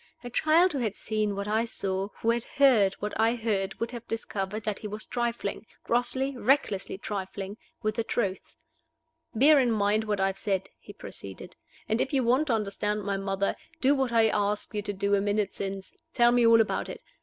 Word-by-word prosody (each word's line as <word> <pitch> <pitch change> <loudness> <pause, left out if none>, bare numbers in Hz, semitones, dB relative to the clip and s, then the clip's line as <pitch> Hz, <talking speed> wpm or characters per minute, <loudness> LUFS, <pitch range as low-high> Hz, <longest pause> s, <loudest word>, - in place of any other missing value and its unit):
A 245 - -7
child 325 +7 +4
who 280 - -1
had 220 -5 -1
seen 215 -2 -1
what 200 +1 -4
I 220 +2 +2
saw, 195 -4 -3
who 230 - +3
had 235 0 -1
heard 245 -10 +4
what 210 +1 -4
I 225 +2 +3
heard 205 -4 -2
would 230 0 -2
have 235 -2 -8
discovered 210 -2 -4
that 210 -2 -2
he 215 - -5
was 210 +1 -6
trifling 235 -3 -3 0.2
grossly, 260 +3 0
recklessly 240 -7 +1
trifling 195 -1 -5 0.3
with 215 0 +1
the 230 +1 -1
truth. 200 -5 -2 0.8
"Bear 285 +5 +6
in 250 -2 +3
mind 215 0 +1
what 210 -2 -1
I 195 - +3
have 195 0 -2
said," 195 -2 -1
he - - -12
proceeded; - - -10 0.3
"and 220 +2 +1
if 270 - -2
you 265 -2 +3
want 255 +6 +2
to 245 - +2
understand 210 0 -1
my 200 0 -1
mother, 195 0 -1 0.2
do 270 +2 +4
what 265 -3 0
I 225 -1 +4
asked 205 +1 -1
you 210 - -1
to 205 - -3
do 200 0 -1
a 200 - +4
minute 205 0 0
since 195 -1 -5 0.2
tell 240 0 +5
me 240 -1 +4
all 230 0 +7
about 220 - -1
it. - - -8
215 Hz, 205 wpm, -28 LUFS, 200-240 Hz, 0.8 s, all